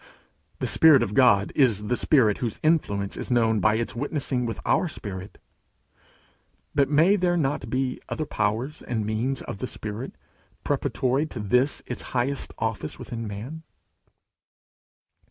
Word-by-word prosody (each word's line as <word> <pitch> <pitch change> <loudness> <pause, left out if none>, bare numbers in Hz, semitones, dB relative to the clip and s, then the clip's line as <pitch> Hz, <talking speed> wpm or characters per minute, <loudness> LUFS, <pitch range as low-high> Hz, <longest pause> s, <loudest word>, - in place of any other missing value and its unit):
The - - -3
Spirit 150 -6 +6
of 105 - -3
God 110 -6 +4
is 115 -8 +3
the 125 - 0
Spirit 120 -7 +3
whose 115 -4 -3
influence 100 -12 +1
is - - -4
known 115 -3 +3
by 110 +2 +3
its 115 +1 -2
witnessing 130 -2 -1
with 115 - -4
our 180 - +2
spirit. 100 - -7 1.4
But 140 -2 +2
may 160 +7 +5
there 175 -3 +1
not 145 -3 -1
be 130 0 -1
other 155 - -2
powers 115 +5 -2
and 110 -3 -3
means 115 +5 -1
of 100 - -7
the 130 - -3
Spirit 110 +3 -6 0.5
preparatory 135 +4 0
to 130 - -7
this 125 +7 +1
its - - -4 0.2
highest 135 +3 0
office 110 -8 -3
with - - -10
man? 115 +7 -6
125 Hz, 145 wpm, -25 LUFS, 110-140 Hz, 1.4 s, Spirit